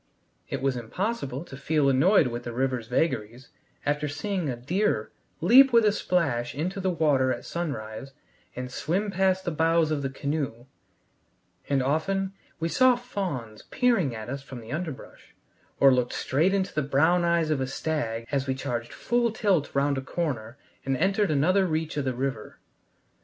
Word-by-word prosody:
It - - -4
was 135 -2 +1
impossible 140 - -3
to 135 - -10
feel 145 +1 +1
annoyed 150 +8 +5
with 120 -1 -3
the 120 - -5
river's 130 -2 -1
vagaries 125 -2 -1 0.4
after 150 +1 0
seeing 165 +3 -2
a 125 - -2
deer 140 - -1 0.3
leap 260 +10 +7
with 230 -2 +5
a 210 - +5
splash 145 - 0
into 180 +7 -2
the 190 0 0
water 145 -6 +2
at 120 - -4
sunrise 135 -7 -5 0.4
and 125 0 -5
swim 190 +10 -1
past 190 0 +1
the 175 - 0
bows 165 0 +2
of 150 -2 0
the 135 - -2
canoe; 140 -4 -3 1.0
and 135 -2 +2
often 190 +8 0 0.3
we 165 - 0
saw 255 +8 +4
fawns 175 - -5
peering 230 - +2
at 110 -1 -7
us 140 +2 -4
from 130 -2 -9
the 115 0 -10
underbrush, 155 -3 -7 0.4
or 135 -1 +7
looked 125 -1 0
straight 155 +8 +1
into 190 -1 -1
the 155 - 0
brown 160 +6 +3
eyes 170 -2 +2
of 145 -3 0
a 130 - -1
stag 125 -5 -2
as 140 -1 0
we 130 - 0
charged 120 -3 -4
full 240 -1 +1
tilt 195 -9 +1
round 140 0 +2
a - - -5
corner 130 -6 -3 0.3
and 135 -1 0
entered 195 - +2
another 180 +7 +3
reach 160 -1 -2
of 145 -2 -1
the 130 -2 -1
river. 130 -4 -4
145 Hz, 175 wpm, -26 LUFS, 130-180 Hz, 1.0 s, leap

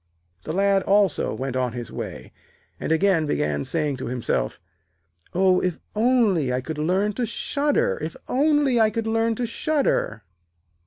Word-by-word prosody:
The - - -3
Lad 195 +2 +2
also 195 -3 +2
went 130 -1 -4
on 125 -2 0
his 120 -2 -6
way, 65 0 -7 0.5
and - - -3
again 165 -2 +3
began 75 - 0
saying 150 -4 -1
to 125 - -5
himself: 115 - -1 0.8
'Oh, 185 0 +4
if 180 -2 -1 0.2
only 215 - +2
I 125 - 0
could 150 +4 -6
learn 190 +7 +1
to 245 +3 -1
shudder, 440 - 0
if - - -4
only 285 -2 +2
I 220 -1 +5
could 225 +1 -3
learn 225 0 +1
to 245 - -2
shudder.' 270 - 0
195 Hz, 155 wpm, -24 LUFS, -, 0.8 s, I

